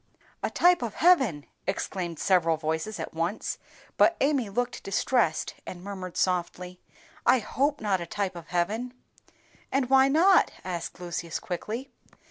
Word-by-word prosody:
"A - - -1
type 355 -3 +4
of 230 -4 -4
heaven!" 265 - +3 0.2
exclaimed 180 -3 -3
several 165 -3 +2
voices 160 +7 -3
at - - -5
once; 170 +6 -2 0.4
but 340 - +5
Amy 275 -6 +1
looked 245 +4 -2
distressed, 195 -3 0
and 180 -1 -8
murmured 190 -3 -6
softly, 180 0 -1 0.4
"I - - +5
hope 275 +6 0
not 195 -4 +1
a 170 - -5
type 195 0 -2
of 170 -1 -9
heaven." 215 +8 -1 0.8
"And 265 -1 0
why 265 0 +7
not?" 345 +7 +5 0.2
asked 175 -2 -5
Lucius, 170 -2 -4
quickly. 220 +9 -5
195 Hz, 140 wpm, -27 LUFS, 175-255 Hz, 0.8 s, why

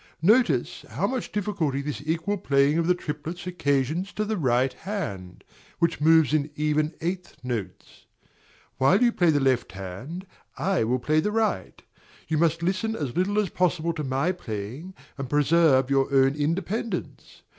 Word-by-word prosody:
Notice 235 +7 +3
how - - -1
much 255 -2 -3
difficulty 195 -10 -1
this 145 +1 -4
equal 165 +6 -1
playing 140 +1 +2
of 165 - 0
the 180 - +4
triplets 155 +2 -6
occasions 160 +1 0
to 215 - -1
the 220 +1 -1
right 130 - +1
hand, 100 - -6 0.3
which 170 -2 0
moves 160 -2 +5
in 150 -1 +1
even 150 +1 0
eighth 180 +2 -4
notes. 120 -6 -6 0.7
While 140 - +4
you 240 - +5
play 175 -6 +2
the 145 -2 +3
left 130 -7 +1
hand, 100 - -7 0.3
I 190 -8 +1
will 125 +3 +1
play 155 +5 +1
the 210 +7 0
right: 215 - -1 0.5
you 155 -1 0
must 165 0 +1
listen 220 +5 0
as 140 - -4
little 190 +4 +1
as 210 -3 +2
possible 170 -2 0
to 155 -2 -4
my 135 +6 0
playing, 130 - -6 0.2
and 135 -2 -4
preserve 145 -2 +3
your 135 0 +2
own 135 0 +4
independence. 175 +10 -3
155 Hz, 160 wpm, -25 LUFS, 135-180 Hz, 0.7 s, moves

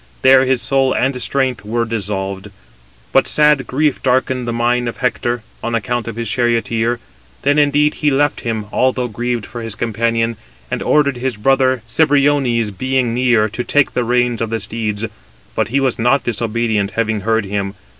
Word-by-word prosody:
There 130 0 +6
his 130 -2 +1
soul 135 -1 +2
and 130 -1 0
strength 130 0 -1
were 115 +3 -1
dissolved. 100 -3 -3 0.6
But - - +3
sad 150 -2 +3
grief 145 +1 0
darkened 130 -1 0
the - - -1
mind 120 +1 0
of - - -8
Hector, 120 -2 -1 0.2
on 120 0 -1
account 120 +2 -2
of 115 - -5
his 115 0 -4
charioteer. 115 0 0 0.4
Then 145 +2 +3
indeed 145 +1 +3
he 150 - 0
left 145 +1 +1
him, 110 -3 -3
although 130 -1 +1
grieved 120 0 -3
for 120 - -8
his 115 -2 -5
companion, 115 0 -1 0.3
and - - -2
ordered 140 -3 +2
his 125 -2 -3
brother 130 +1 +2
Cebriones, 135 -4 +2
being 130 +3 -1
near, 120 -3 +3
to 110 +4 -4
take 145 +2 +2
the 125 - 0
reins 120 -1 +1
of 115 - -1
the 115 0 -2
steeds; 110 -1 -3 0.5
but - - 0
he 130 +5 0
was 130 -3 0
not 125 +3 +2
disobedient, 115 -3 -1
having 110 -2 0
heard 110 +1 0
him. 100 0 -3
120 Hz, 175 wpm, -17 LUFS, 115-130 Hz, 0.6 s, There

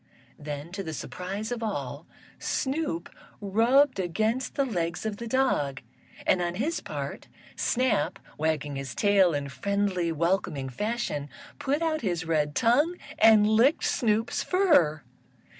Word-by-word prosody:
Then, 145 +2 -6
to 195 +2 -4
the 160 -5 -5
surprise 195 +8 -5
of 240 -1 -3
all, 145 - -4 0.3
Snoop 265 - -2 0.3
rubbed 230 +6 +3
against 220 +8 -1
the 275 - +2
legs 175 -6 -2
of 215 -2 -2
the 235 - -6
dog, 185 - +1 0.5
and, 180 - +3
on 175 0 -1
his 295 - -1
part, - - -6 0.3
Snap, 250 - +1 0.2
wagging 150 -2 -1
his 135 -2 -5
tail 195 -5 +4
in 145 -1 -2
friendly, 190 +2 -1
welcoming 165 -4 0
fashion, 210 - -3 0.3
put 290 +4 0
out 315 -1 0
his 180 -6 -1
red 150 -3 0
tongue 290 +10 +3 0.2
and 220 -1 +7
licked 230 +8 +4
Snoop's 225 -2 +1
fur. 295 - +3
200 Hz, 135 wpm, -27 LUFS, 160-240 Hz, 0.5 s, and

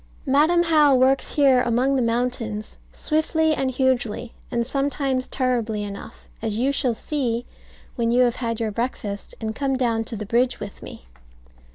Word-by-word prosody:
Madam 315 +6 +4
How 305 -4 +5
works 260 +1 +2
here 270 -4 +5
among 245 +3 +1
the 260 - +2
mountains 230 -2 -2
swiftly 315 0 +1
and 270 -3 0
hugely, 245 -3 0 0.2
and 235 0 -1
sometimes 275 -1 -1
terribly 235 -5 -1
enough; 200 -1 -9
as 220 -1 -2
you 260 +4 +2
shall 255 -4 0
see 245 -2 -2 0.5
when 230 -1 +1
you 245 +2 +4
have 240 -1 +1
had 230 -2 -2
your 225 -2 -1
breakfast, 210 -3 -4
and 220 -1 -4
come 270 0 0
down 230 -3 +1
to 230 - -5
the 215 0 -5
bridge 245 +4 +1
with 200 -1 -8
me. - - -10
250 Hz, 165 wpm, -23 LUFS, 230-270 Hz, 0.5 s, How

